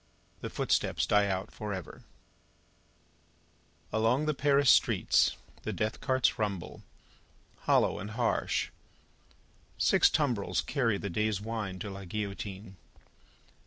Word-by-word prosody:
The - - -5
Footsteps - - 0
Die 105 -1 +3
Out 95 0 -2
For 105 -1 -5
Ever 95 -2 -7 1.9
Along 115 +7 +2
the 155 - +1
Paris 140 -1 +4
streets, - - +3 0.2
the - - -3
death 110 +1 -2
carts 130 -4 +1
rumble, 100 -5 -3 0.9
hollow - - +3
and 100 - -6
harsh. 115 +2 0 1.1
Six - - +5
tumbrils 125 -10 0
carry 115 -8 0
the 100 -1 -5
day's 105 +1 0
wine 105 -3 -4
to 100 +2 -6
La 95 0 -8
Guillotine. 100 0 -5
105 Hz, 115 wpm, -30 LUFS, 100-120 Hz, 1.9 s, Six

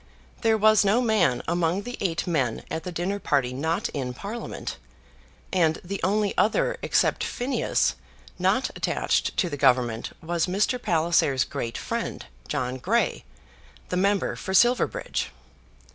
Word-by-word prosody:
There 225 -2 +3
was 215 0 +5
no 205 +4 +3
man 215 - +2
among 175 +3 0
the 245 +2 -5
eight 170 -4 0
men 135 -10 0
at 160 - -3
the 180 - -4
dinner 180 +4 -2
party 135 -8 +1
not 160 +5 -1
in 125 -3 -4
Parliament, 210 - -6 0.8
and 165 -4 +2
the 195 +2 -5
only 205 +1 +1
other 215 - +2
except - - +2
Phineas 255 +3 0 0.5
not - - +2
attached - - 0
to 185 - +2
the 145 -4 -4
Government 125 -4 +2
was 170 +1 -1
Mr. 205 +7 0
Palliser's 160 - +2
great 115 +2 -4
friend, - - -4 0.2
John 125 0 -2
Grey, 225 - 0 0.6
the - - -1
member 200 +1 +1
for 190 - -3
Silverbridge. 240 +3 +2
175 Hz, 140 wpm, -25 LUFS, 140-210 Hz, 0.8 s, was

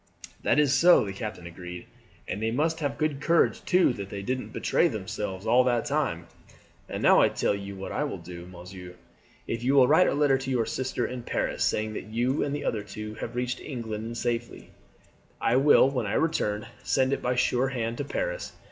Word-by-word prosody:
"That - - +2
is 145 -2 +4
so," 170 -1 +6
the 100 - -5
captain 105 -3 -6
agreed; 90 +1 -8 0.4
"and 100 - -4
they 110 - +1
must 155 +7 0
have 145 -3 -2
good 150 -2 -1
courage 170 +2 +2
too 180 -7 +4
that 100 -3 -7
they 100 -1 -6
didn't 130 +4 -3
betray - - +2
themselves 95 -1 -4
all 120 +3 +5
that 120 -2 +1
time. 135 - -1 0.6
And - - -4
now - - +6
I - - +5
tell - - 0
you 100 0 -6
what 95 0 -6
I - - -1
will - - -3
do, 85 0 -10
monsieur. 90 0 -10 0.5
If 115 - -3
you 135 +3 +2
will 130 -2 +7
write 160 +6 +5
a - - +1
letter 145 -2 +3
to 135 - -5
your 125 -3 +1
sister 130 0 -2
in 125 -1 -5
Paris, - - -1
saying 110 0 0
that - - -5
you 120 +5 0
and 145 0 -2
the 145 - -5
other 110 - 0
two 105 +1 -7
have - - -5
reached 125 0 -2
England 110 -5 -5
in 115 - -6
safety, 120 0 -3 0.7
I 120 - +2
will 140 -1 +6
when 125 -5 -2
I 100 - -2
return 105 -10 0 0.2
send 130 +1 +1
it - - -2
by 125 0 0
sure 125 +1 +2
hand 120 -3 -3
to - - 0
Paris. - - -3
120 Hz, 210 wpm, -27 LUFS, 105-135 Hz, 0.7 s, will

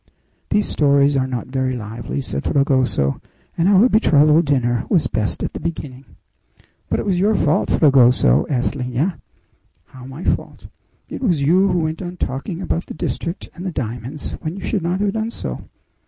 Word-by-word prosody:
"These 210 - +1
stories 140 -1 +3
are 130 -1 +1
not 125 -3 -4
very 130 -1 -1
lively," 115 +5 -5
said 135 - -4
Fragoso, 130 - +1 0.3
"and 170 +3 +2
our 200 +4 +6
betrothal 155 - +4
dinner 125 -6 0
was 175 -6 +2
best 105 -2 -2
at - - -3
the - - -5
beginning." 140 -5 -6 0.8
"But - - 0
it - - -3
was 190 -3 +1
your 210 +3 +3
fault, 155 -4 +1
Fragoso," 125 - +4
answered 135 0 -1
Lina. 130 +8 -2 0.7
"How 130 -1 -13
my 135 +6 -8
fault?" - - -2 0.4
"It - - -7
was 175 - +1
you 180 +7 +4
who 180 -3 +1
went 160 +2 -3
on 180 -1 -6
talking 165 +8 -4
about 170 - -2
the - - -8
district 170 +3 -4
and 180 - -9
the 185 - -3
diamonds, 125 +1 -5
when 155 +3 -4
you 195 - -8
should 200 - -1
not 175 +3 -1
have 205 -1 +1
done 220 0 -2
so." - - -6
145 Hz, 180 wpm, -20 LUFS, 130-180 Hz, 0.8 s, our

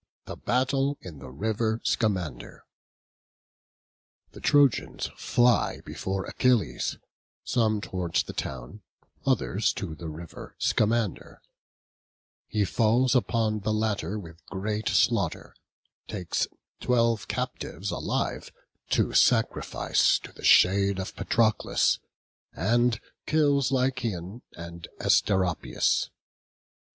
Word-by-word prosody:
THE - - -6
BATTLE 135 +3 0
IN 80 -6 -10
THE 65 - -9
RIVER 110 - -1
SCAMANDER. 90 - -2 1.7
The - - -12
Trojans 145 -5 +2
fly 120 0 +2
before 95 0 -3
Achilles, 110 - +1 0.5
some 110 -3 +1
towards 90 -4 -1
the - - -8
town, 65 - -6 0.5
others - - +1
to 80 - -5
the 80 +1 -8
river 80 +2 -10
Scamander; 110 -2 0 1.1
he 105 -1 0
falls 120 +5 +2
upon 115 -4 +1
the 105 +2 -2
latter 105 -3 -1
with 85 -4 -10
great 105 +2 -2
slaughter, - - +1 0.5
takes 90 -6 -2 0.3
twelve 115 -4 +1
captives 95 +6 -4
alive, - - -2 0.4
to - - +1
sacrifice - - +3
to - - -11
the - - -15
shade 100 +1 +5
of 95 0 -5
Patroclus; 110 -2 +2 0.5
and 120 +4 +2 0.3
kills 145 -4 +2
Lycaon 125 -6 -1
and 85 0 -9
Asteropaeus. 95 -4 +1
105 Hz, 100 wpm, -27 LUFS, 90-120 Hz, 1.7 s, shade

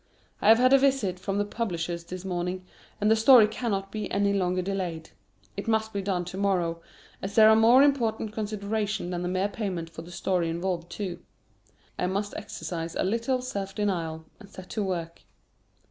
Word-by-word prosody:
I - - +1
have 225 - +8
had 255 +2 +4
a 275 - +7
visit 260 -10 +1
from 195 +1 -2
the 205 - +1
publishers 175 -6 -3
this 185 +2 -7
morning, 180 0 -3 0.3
and 210 +1 +2
the - - +6
story 225 0 +7
cannot 200 -3 -3
be 215 -2 -4
any 200 0 +2
longer 185 -2 0
delayed; 180 -4 -4 0.4
it - - -5
must 220 0 0
be 200 - -1
done 185 -2 -1
to 180 +2 -7
morrow, 175 -4 0 0.4
as 195 +1 -5
there 220 -1 +8
are - - +6
more 235 +5 +6
important 230 -6 +1
considerations 210 -2 -2
than 175 -1 -3
the 180 - -2
mere 185 +2 +1
payment 190 -6 -4
for 165 - -8
the 165 - -12
story 180 -1 -1
involved 170 0 -3
too. 180 -4 -5 0.8
I - - +1
must 200 +2 -2
exercise 165 -1 -5
a - - 0
little 235 +6 0
self 200 -6 -4
denial, 165 -6 -2
and 205 -3 -14
set 185 -2 -11
to 215 - -2
work. 170 -3 -4
195 Hz, 190 wpm, -27 LUFS, 180-220 Hz, 0.8 s, have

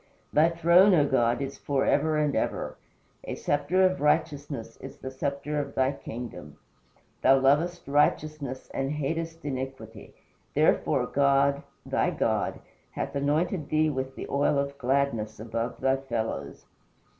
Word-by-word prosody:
Thy 155 +3 +5
throne, 170 +4 +5
O 145 -3 +4
God, 120 -1 +2
is 140 0 -6
for 140 -2 0
ever 155 +1 +2
and 150 -2 +1
ever. - - -2 0.5
A - - -4
sceptre 145 +6 +1
of 185 0 +1
righteousness 145 -6 0
is - - -10
the 130 - -7
sceptre 140 +2 -3
of 140 -1 -5
thy 130 0 +2
kingdom. 115 - -8 0.6
Thou 135 +1 +6
lovest 150 +6 +2
righteousness 145 -2 0
and 135 +2 -1
hatest 165 +2 -3
iniquity. 130 -6 -6 0.4
Therefore - - +2
God 140 0 +2 0.2
thy - - +1
God - - -1 0.3
hath - - -4
anointed 150 +3 0
thee 155 0 +2
with 130 -1 -4
the - - -6
oil 140 +1 +1
of 140 0 -1
gladness 125 -5 0
above 115 +2 -4
thy 135 0 +2
fellows." 115 - -4
140 Hz, 140 wpm, -27 LUFS, 130-150 Hz, 0.6 s, Thou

